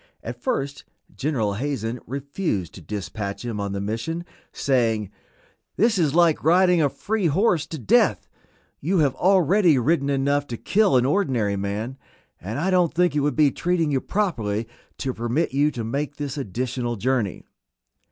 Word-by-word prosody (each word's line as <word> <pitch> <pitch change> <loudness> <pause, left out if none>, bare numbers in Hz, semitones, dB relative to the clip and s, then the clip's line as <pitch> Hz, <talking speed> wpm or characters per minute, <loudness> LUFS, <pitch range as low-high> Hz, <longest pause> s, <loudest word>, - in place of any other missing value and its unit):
At 120 +1 -7
first 140 +3 -2 0.3
General 125 -8 -1
Hazen 120 0 -3
refused 140 - -3
to 95 - -11
dispatch 100 +4 -5
him 115 -3 -3
on 100 -1 -2
the 100 - -3
mission, 115 +12 -3 0.3
saying, 115 -6 0 0.6
"This 220 -1 +2
is 155 -3 +2
like 170 -3 +4
riding 180 +1 +4
a 145 - +3
free 210 +4 -1
horse 170 0 +2
to 160 - -6
death; 120 -8 +2 0.5
you 185 +6 0
have 145 -5 +3
already 185 -3 +4
ridden 140 +2 +1
enough 140 +1 +1
to 120 - -5
kill 200 - +3
an 125 - +2
ordinary 130 - +1
man, 105 +7 -4 0.4
and 105 +8 -5
I 180 +6 0
don't 180 -3 +2
think 175 -2 +2
it - - +3
would 145 +1 0
be 150 -3 +4
treating 170 -2 0
you 135 -2 +1
properly 115 - -1 0.3
to 130 -2 -2
permit 120 +6 -1
you 145 +2 +3
to 120 -6 -5
make 140 +6 -3
this 145 -2 -4
additional 125 -1 -3
journey." 120 -2 -1
140 Hz, 160 wpm, -23 LUFS, 115-165 Hz, 0.6 s, like